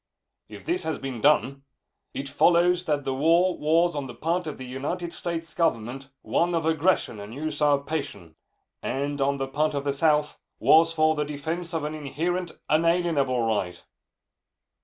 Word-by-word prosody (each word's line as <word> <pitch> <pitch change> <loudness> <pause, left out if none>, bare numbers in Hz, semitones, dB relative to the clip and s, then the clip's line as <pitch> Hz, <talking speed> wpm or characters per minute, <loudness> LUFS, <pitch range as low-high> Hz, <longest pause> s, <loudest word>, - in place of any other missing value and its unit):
If - - -11
this 355 +2 0
has 160 - -2
been 130 -4 -6
done, 140 -2 +3 0.5
it 140 - -5
follows 175 +4 +3
that 150 -3 0
the 135 - -2
war 170 +6 +3
was, 165 +3 +2
on 140 -2 -3
the 120 - -9
part 170 +2 -1
of 150 - -5
the 130 - -8
United 150 +7 -4
States 165 -1 -5
Government, 135 -4 -1
one 175 0 +1
of 165 -1 -1
aggression 160 - +1
and 100 +3 -9
usurpation, 145 - -1 0.5
and, 140 +1 -2
on 140 +1 +1
the 135 0 -2
part 150 +2 0
of 140 - -2
the 140 -1 0
South, 150 0 +1 0.2
was 165 +1 +5
for 155 -1 +3
the 150 -1 -1
defense 160 +4 -4
of 165 -3 -2
an 150 +1 -3
inherent, 165 +4 -3 0.2
unalienable 155 -6 +2
right. 95 -6 -2
150 Hz, 160 wpm, -26 LUFS, 135-165 Hz, 0.5 s, was